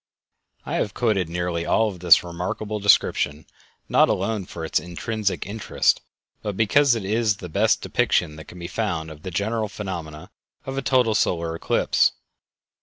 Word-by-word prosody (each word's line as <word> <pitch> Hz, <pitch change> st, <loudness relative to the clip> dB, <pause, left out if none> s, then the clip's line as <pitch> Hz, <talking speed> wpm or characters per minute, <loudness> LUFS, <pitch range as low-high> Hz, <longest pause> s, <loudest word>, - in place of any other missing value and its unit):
I -, -, -2 dB
have 100 Hz, -, -2 dB
quoted 100 Hz, -8 st, +1 dB
nearly 85 Hz, 0 st, -2 dB
all 110 Hz, +5 st, +2 dB
of 95 Hz, -4 st, -6 dB
this 85 Hz, -1 st, +6 dB
remarkable 90 Hz, +5 st, -4 dB
description 80 Hz, -6 st, +2 dB, 0.4 s
not -, -, +4 dB
alone 100 Hz, 0 st, -1 dB
for 80 Hz, -1 st, -6 dB
its -, -, +1 dB
intrinsic 100 Hz, +4 st, -3 dB
interest, 105 Hz, +2 st, +1 dB, 0.4 s
but 105 Hz, -3 st, -4 dB
because 125 Hz, +4 st, +4 dB
it 110 Hz, -4 st, -4 dB
is 110 Hz, 0 st, +1 dB
the 90 Hz, -3 st, -8 dB
best -, -, +2 dB
depiction 75 Hz, -, +1 dB
that 80 Hz, -, -10 dB
can 90 Hz, -, -12 dB
be 85 Hz, -, -7 dB
found 85 Hz, -7 st, -3 dB
of 75 Hz, -1 st, -12 dB
the 95 Hz, -, -6 dB
general 110 Hz, +4 st, -1 dB
phenomena 85 Hz, -7 st, -7 dB, 0.3 s
of 135 Hz, -, -5 dB
a 135 Hz, -, -1 dB
total 125 Hz, -4 st, +2 dB
solar 85 Hz, -5 st, 0 dB
eclipse. -, -, +2 dB
95 Hz, 165 wpm, -23 LUFS, 85-110 Hz, 0.4 s, this